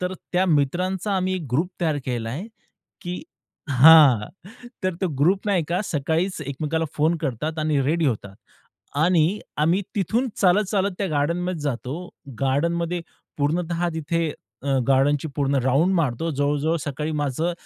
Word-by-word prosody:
तर 180 +1 -2 0.2
त्या 180 +1 +3
मित्रांचा 180 +6 0
आम्ही 185 0 0
ग्रुप 155 +8 +1
तयार 160 -3 +1
केलाय, 125 - -3 0.5
की 180 +8 -5 0.5
हां, 135 -5 +7 0.6
तर 185 -1 0
तो 190 - +1
ग्रुप 185 +8 +2
नाही 195 -4 +2
का 175 +3 0
सकाळीच 165 +4 -1
एकमेकाला 155 +4 -2
फोन 160 +3 +2
करतात 155 +1 -3
आणि 155 -2 +1
रेडी 160 +4 +1
होतात. 105 -6 -2 0.6
आणि 170 +5 +2 0.2
आम्ही 165 +6 +2
तिथून 225 +6 0
चालत, 195 +2 +4
चालत 200 -1 +1
त्या 200 - 0
गार्डनमध्ये 170 +3 -1
जातो. 145 +5 -4 0.3
गार्डनमध्ये 170 +6 0 0.4
पूर्णतः 170 +4 0
तिथे 160 0 -1 0.3
अ, 135 -1 +1
गार्डनची 140 +3 +3
पूर्ण 140 -1 +1
राउंड 140 +9 +3
मारतो. 165 -1 0
जवळ-जवळ 145 +2 0
सकाळी 150 +3 -3
माझं 145 +5 -1
160 Hz, 135 wpm, -23 LUFS, 145-180 Hz, 0.6 s, हां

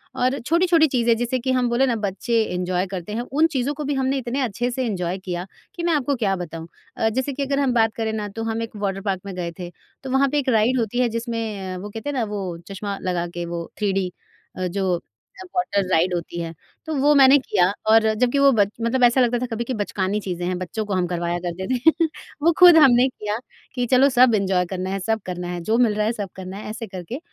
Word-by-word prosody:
और 255 +2 +1
छोटी-छोटी 335 +3 +3
चीज़ें 240 -4 +2
जैसे 245 +2 -1
कि 260 +2 -1
हम 250 -1 +1
बोलें 240 +3 +3
ना, 240 - +1
बच्चे 220 +3 0
एन्जॉय 180 -1 -1
करते 185 +1 -6
हैं, 230 - -2
उन 290 +6 +2
चीज़ों 280 -3 -1
को 300 +1 -5
भी 290 0 -1
हमने 270 0 0
इतने 260 +1 -2
अच्छे 245 0 -1
से 255 +1 -2
एन्जॉय 185 -5 -2
किया 180 -2 -5 0.3
कि 345 - -5
मैं 340 -1 +2
आपको 285 -2 +1
क्या 205 -6 0
बताऊँ। 165 -2 -7 0.3
अ, 225 - +2
जैसे 260 +5 -2
कि 280 - -2
अगर 275 +1 0
हम 270 -3 +2
बात 225 -2 +3
करें 220 -1 -2
ना, 210 -1 -3
तो 225 +3 -6
हम 225 0 -2
एक 230 - -8
वॉटर 195 -2 -2
पार्क 195 -2 -2
में 200 - -6
गए 175 -2 -3
थे, 175 -1 -5 0.3
तो 265 - -6
वहाँ 270 +1 +3
पे 295 +2 +1
एक 270 - -1
राइड 235 +2 +3
होती 230 +1 -1
है 250 -1 +3
जिसमें 225 -5 -4
वो 200 +3 -7
कहते 225 +7 -6
हैं - - -2
ना, 240 - +1
वो 195 -5 -4
चश्मा 200 0 -5
लगा 180 -2 -1
के 175 0 -4
वो 170 0 -5
थ्री 205 -2 0
डी 190 -2 -1 0.5
अ, 185 0 -1
जो 180 -1 -1 0.5
वाटर 200 - 0
राइड 180 +2 +3
होती 170 0 -4
है। 165 -1 -4 0.3
तो 315 - -3
वो 290 +2 +4
मैंने 270 0 +7
किया 205 -8 +2 0.3
और 225 0 +7
जबकि 250 +5 +1
वो 275 0 +6
बच्च 205 -1 +3
मतलब 240 +2 +1
ऐसा 245 +2 +5
लगता 245 0 +2
था 250 - -2
कभी 225 +1 -2
कि 255 - -4
बचकानी 205 -2 -1
चीज़ें 180 -3 -4
हैं, 180 0 -1
बच्चों 200 +5 -4
को 205 - -3
हम 180 -1 +1
करवाया 175 0 -2
करते 175 +2 -4
थे 320 +6 +3 0.4
वो 335 +3 +5
ख़ुद 355 -2 +9
हमने 260 -4 +6
किया 210 -4 -4 0.4
कि 245 -1 0
चलो 265 +2 +6
सब 250 -3 +5
एन्जॉय 190 -3 +1
करना 185 +1 -4
है, 195 +1 -2
सब 220 +3 -1
करना 180 -1 -5
है 175 -1 -4
जो 220 +7 +1
मिल 235 -3 +3
रहा 210 0 +1
है 220 - +1
सब 205 -4 -5
करना 190 +1 -7
है 210 - -7
ऐसे 220 +1 -6
करके। 190 - -7
220 Hz, 250 wpm, -22 LUFS, 190-255 Hz, 0.5 s, ख़ुद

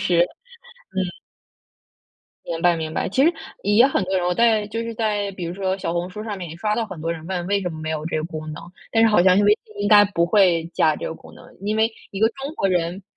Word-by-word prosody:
是。 180 -4 +2
嗯。 485 - -7 1.9
明 165 -1 -4
白 175 -1 +3
明 160 -1 -4
白， - - -1
其 260 +8 +2
实 335 - +4 0.3
也 205 +5 +5
很 270 -8 0
多 190 +1 -1
人 175 -1 0
我 180 - +1
在 220 -2 +3
就 225 +2 -4
是 230 0 -5
在 210 -2 -1
比 185 -2 -6
如 170 - -4
说 190 0 -1
小 170 -3 -2
红 175 +1 -2
书 210 +2 -7
上 210 -2 -4
面 180 -2 -6
也 165 - -9
刷 210 +3 0
到 230 - -1
很 190 -7 -9
多 165 +1 -2
人 160 -1 -9
问 180 -1 -3
为 200 0 +1
什 180 - -2
么 155 - -8
没 155 - -5
有 155 -1 -3
这 160 - -2
个 155 - -3
功 160 -2 -6
能。 - - -8 0.3
但 225 0 +4
是 225 - +6
好 190 -5 +4
像 185 0 +5
是 205 - +4
微 205 - +5
信 215 - -19
应 205 - +1
该 205 -1 +8
不 180 -4 0
会 175 -3 +4
加 155 -1 +3
这 - - -5
个 160 - -4
功 - - -15
能， - - -15 0.2
因 210 +2 -1
为 220 +1 +3 0.2
一 195 - -6
个 220 - +5
中 275 +5 -7
国 195 - 0
人 180 +1 -1
190 Hz, 290 characters per minute, -22 LUFS, 170-215 Hz, 1.9 s, 该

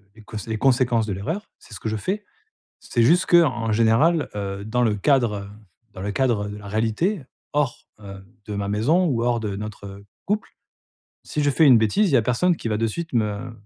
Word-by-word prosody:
les 110 - -15
cons 110 - -8
les 110 -1 -2
conséquences 125 -2 +2
de 100 - -2
l'erreur, 160 - -4
c'est 115 - -16
ce 105 - -8
que 110 - -3
je 110 - -2
fais. 195 - -3 0.6
C'est 120 - 0
juste 175 +10 +4
qu'en 130 -10 +3
général, 115 +9 +3
heu, 100 -1 -4
dans 120 +3 0
le 110 -3 +2
cadre, 120 0 +2
heu, - - -11 0.5
dans 95 - -8
le 100 +1 -3
cadre 115 -5 0
de 105 - -7
la 100 - -11
réalité 115 - 0 0.3
hors, 145 -4 -1
heu, 100 -2 -10 0.2
de 105 - -5
ma 100 0 -3
maison 140 - +2
ou 125 -8 0
hors 120 -1 +1
de 105 -3 -3
notre 100 -1 -8 0.2
couple, 210 +2 -1 0.7
si 150 - -3
je 145 - +3
fais 150 +3 +3
une 130 -5 +8
bêtise, 115 - +2
il - - -2
y - - +7
a - - +3
personne 125 +11 +1
qui 120 - -6
va 105 - 0
de 115 +1 +1
suite 165 +10 -5
me 110 +1 -1
115 Hz, 220 wpm, -23 LUFS, 105-145 Hz, 0.7 s, une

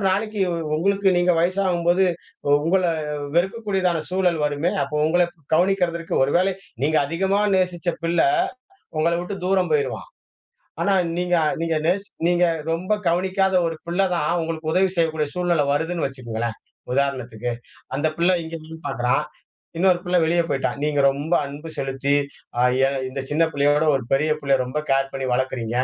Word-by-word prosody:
அப்பறம் 195 - +2
நாளைக்கு 210 +2 -1 0.4
உங்களுக்கு 195 +4 +2
நீங்க 175 0 +3
வயசாகும்போது 180 0 +2 0.5
உங்களை 170 +6 +1 0.5
வெறுக்கக்கூடியதான 190 -3 0
சூழல் 180 -4 +1
வருமே. 145 +4 0
அப்ப 150 - -5
உங்களை 175 +2 +3 0.3
கவனிக்கிறதற்கு, 175 -1 +1
ஒருவேளை 180 +7 +2 0.3
நீங்க 155 +2 +2
அதிகமா 190 +6 0 0.2
நேசிச்ச 180 -2 -1 0.2
பிள்ள 170 +1 +1 0.8
உங்களை 170 +2 +2
விட்டு 185 +3 -5
தூரம் 185 -4 +1
போயிருவான். 150 - -1 0.7
ஆனா 200 - +2 0.2
நீங்க 180 0 -1 0.3
நீங்க 165 -1 0
நேசி 195 +4 +1 0.2
நீங்க 175 0 +3 0.3
ரொம்ப 175 +5 0
கவனிக்காத 190 +2 +1
ஒரு 165 -1 -2
பிள்ளை 175 +3 -3
தான் 150 -3 0
உங்களுக்கு 160 -1 -3
உதவி 190 +3 +3
செய்யக்கூடிய 160 -3 +1
சூழ்நிலை 175 -4 +1
வருதுன்னு 160 +3 0
வச்சுக்கங்களேன் 120 -4 -4 0.4
உதாரணத்துக்கு. 125 -4 -1 0.4
அந்த 145 +3 +1
பிள்ளை 175 +2 +3
இங்கேயும் 160 0 -9
பார்க்கிறான். 125 +1 +1 0.6
இன்னொரு 180 0 +3
பிள்ளை 180 0 +2
வெளிய 170 +2 +2
போய்ட்டான். 140 0 -1
நீங்க 150 -1 +1
ரொம்ப 145 +5 -2
அன்பு 145 +3 -9
செலுத்தி 135 +1 0 0.4
அ - - +4 0.2
ய - - +4 0.3
இந்த 135 +1 -4
சின்ன 155 +3 +2
பிள்ளையோட 145 +1 +2
ஒரு 135 - -2
பெரிய 150 +3 +2
பிள்ளையை 140 -2 +2
ரொம்ப 130 +4 -3
கேர் 135 0 +2
பண்ணி 135 -1 -3
வளர்க்கிறீங்க. 125 -2 -2
165 Hz, 145 wpm, -22 LUFS, 145-180 Hz, 0.8 s, அ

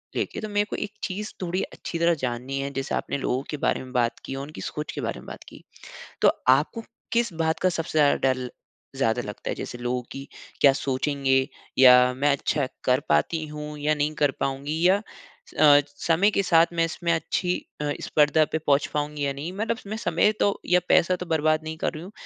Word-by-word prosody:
लेके। - - -2
तो 215 - -5
मेको 205 0 -1
एक 205 - -4
चीज़ 210 +2 -4
थोड़ी 180 +1 -1
अच्छी 165 - -6
तरह 170 0 +4
जाननी 125 +2 -3
है। 140 - -2
जैसे 135 0 -2
आपने - - -2
लोगों 130 -1 -1
के 150 - -3
बारे 140 - 0
में 130 - -11
बात 120 -1 0
की 135 - -5
और 135 - -5
उनकी 150 - -10
सोच 150 0 -5
के - - -5
बारे - - -3
में - - -14
बात - - -9
की। - - -14 0.6
तो - - +6 0.2
आपको 155 - +3 0.3
किस 235 -3 +1
बात 160 0 0
का 185 - +3
सबसे 165 -2 -3
ज़्यादा 145 -1 +5 0.2
डर 125 -1 -6 0.5
ज़्यादा 125 -3 +1
लगता 105 -2 -7
है? - - -1
जैसे 120 - -6
लोगों 125 +1 -2
कि, 135 +1 -7 0.3
क्या 140 - +8
सोचेंगे 135 0 0 0.3
या 125 -1 +7
मैं 145 +2 +3
अच्छा 140 0 0 0.2
कर 130 +1 +3
पाती 155 - +1
हूँ 150 0 -7
या 150 +1 +1
नहीं 150 +1 0
कर 145 -2 +4
पाऊँगी 140 +3 -2
या 190 - +5 0.6
अ, 145 -1 +8 0.2
समय 170 +7 +3
के - - +1
साथ 165 -2 +5
मैं 165 -1 +1
इसमें 170 0 -2
अच्छी 180 +2 -1 0.3
अ, 145 - -1
स्पर्धा 150 +1 +3
पे - - +1
पहुँच 145 -2 +1
पाऊँगी 150 -1 -2
या 140 - -1
नहीं? 150 +5 -5
मतलब 225 +4 -2
मैं 215 - -4
समय 215 -1 +2
तो 200 - +1
या 180 0 +4
पैसा 180 +2 +4
तो 180 - -6
बर्बाद 155 -1 +1
नहीं 160 0 -6
कर - - -2
रही 155 - -7
हूँ 190 - -10
150 Hz, 215 wpm, -25 LUFS, 135-170 Hz, 0.6 s, क्या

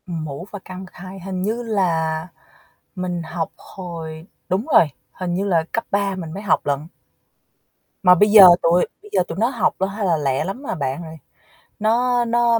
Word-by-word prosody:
Mũ 160 -2 -5
và 205 - -6
căn 185 0 -8
bậc 185 - -17
hai 190 +1 -10
hình 185 0 -5
như 225 +5 -1
là 165 -7 0 0.7
mình 180 -2 -3
học 165 +1 -4
hồi 165 -3 -8 0.2
đúng 190 +6 0
rồi, - - +7 0.2
hình 180 -2 -4
như 190 +3 -1
là 170 -5 +2
cấp 230 - -2
3 200 -1 0
mình 170 -4 -6
mới 200 - -6
học 195 - +1
lận. 145 +2 -1 1.2
Mà 180 -1 +8
bây 205 +4 +4
giờ 205 -3 +11
tụi 170 +2 +3 0.2
bây 420 - -15
giờ 185 - +3
tụi 165 - -6
nó 225 +3 +2
học 240 -6 0
là 190 - +2
hay 200 +1 -3
là 170 -3 +2
lẹ 135 -3 0
lắm, 200 +9 -5
à, - - -2
bạn 140 +1 -3
rồi. 160 0 -9 0.6
Nó 240 +3 +2
nó 235 0 +3
185 Hz, 195 wpm, -21 LUFS, 165-205 Hz, 1.2 s, giờ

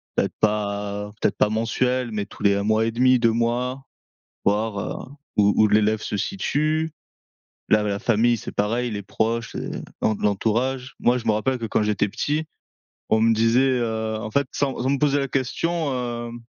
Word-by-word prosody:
peut-être - - 0
pas 105 -1 -1
peut-être - - +1
pas 105 - +3
mensuel, 120 +2 0
mais 105 -1 -2
tous 105 - -12
les 100 -1 +4
1 100 - -1
mois 110 +1 +2
et 115 - 0
1/2, 130 +2 +4
2 115 -1 +4
mois, 120 +3 -1 0.6
voir, 105 +1 +1
heu, 130 - -5 0.3
où 105 -1 +4
où 110 -1 +5
l'élève 105 +1 +3
se 105 - -3
situe. 155 - 0 0.8
Là, 105 -1 +4
la 100 -1 -1
famille 120 +1 +2
c'est 115 - -7
pareil, 115 +4 0
les 100 -1 -4
proches, 115 +3 -1
les - - -4 0.3
l'en 110 - +2
l'entourage. 120 +6 -1
Moi, 125 +1 +3
je 115 - -11
me - - +5
rappelle 125 +5 0
que 115 - -3
quand 110 - +1
j'étais 105 -1 +1
petit, 150 +9 -1 0.6
on 110 - +3
me 115 0 +4
disait, 115 +4 +3
heu, 110 -1 -2
en 110 0 -5
fait, 140 +3 +1
sans 140 -2 -1
sans 130 - +1
me 140 - +1
poser 145 -1 +2
la 140 - 0
question, 145 +4 -1
hem, 120 -1 -4
115 Hz, 190 wpm, -23 LUFS, 105-130 Hz, 0.8 s, où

